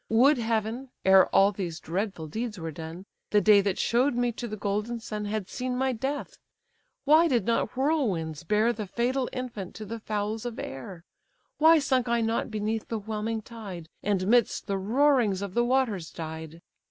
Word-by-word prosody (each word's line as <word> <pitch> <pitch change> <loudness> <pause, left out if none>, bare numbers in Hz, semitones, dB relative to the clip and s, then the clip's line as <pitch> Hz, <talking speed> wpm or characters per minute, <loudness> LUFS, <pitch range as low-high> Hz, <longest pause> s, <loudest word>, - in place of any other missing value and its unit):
Would 255 +5 +5
heaven, 225 +3 -1 0.2
ere 190 0 +7
all 195 +1 +4
these 175 -5 -5
dreadful 185 -1 -3
deeds 220 +7 -4
were 165 -2 -5
done, 165 +4 -8 0.2
The 210 - +4
day 205 -1 +6
that 195 -1 -1
show'd 245 +3 +2
me 245 0 +1
to 235 +1 -6
the 215 -1 -5
golden 210 +4 -2
sun 215 -2 -5
Had 205 -2 -3
seen 250 +2 -3
my 265 0 +1
death! 270 +5 -4 0.7
why 315 +4 +6
did 240 - +1
not 230 -2 0
whirlwinds 205 - 0
bear 215 +7 +2
The 215 -3 -5
fatal 250 +5 -1
infant 235 -8 -6
to 215 - -7
the 225 +3 -6
fowls 215 0 -3
of 240 -2 -5
air? 165 +6 -7 0.5
Why 320 +2 +7
sunk 260 -4 +1
I 235 0 +2
not 225 +2 0
beneath 215 0 -2
the 225 - -2
whelming 220 +1 -3
tide, 195 -8 -9
And 195 -3 0
midst 235 +2 +2
the 195 -1 -1
roarings 230 -2 +2
of 200 -2 -5
the 240 - +2
waters 240 -9 0
died? 160 0 -8
220 Hz, 180 wpm, -27 LUFS, 195-245 Hz, 0.7 s, ere